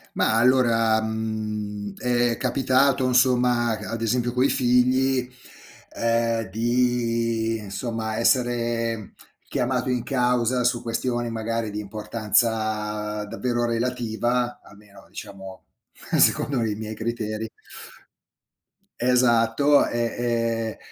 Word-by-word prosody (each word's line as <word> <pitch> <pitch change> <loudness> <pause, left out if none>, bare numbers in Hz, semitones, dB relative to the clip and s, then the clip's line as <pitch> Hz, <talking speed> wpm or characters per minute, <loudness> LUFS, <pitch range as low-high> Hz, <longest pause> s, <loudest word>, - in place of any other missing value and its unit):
Mah, - - +2
allora, 115 -2 +3
mhmm, 105 -2 -4
è 120 -1 +1
capitato, 130 +1 +2
insomma, 125 -2 +2
c - - -7
ad 115 0 -4
esempio 120 +1 0
coi 130 +2 +2
figli, 125 +1 +2 0.7
ehm, 115 -2 0
di, 115 0 0
insomma, 110 +2 -4
essere 115 -2 0 0.3
chiamato 125 -1 -1
in 125 -2 0
causa, 125 -1 +1
su 120 -1 +1
questioni 120 0 -2
magari 115 0 -3
di 105 - -5
importanza 105 0 -1
davvero 120 +3 -2
relativa, 120 0 -1
almeno, 100 -1 -17
diciamo, 95 -1 -10 0.6
secondo 135 -4 +3
i 110 -2 -1
miei 110 +1 -6
criteri. 110 -1 -4 1.5
Esatto, 125 +3 +3
e 120 - -3 0.2
e 115 -2 -1
115 Hz, 100 wpm, -24 LUFS, 110-125 Hz, 1.5 s, allora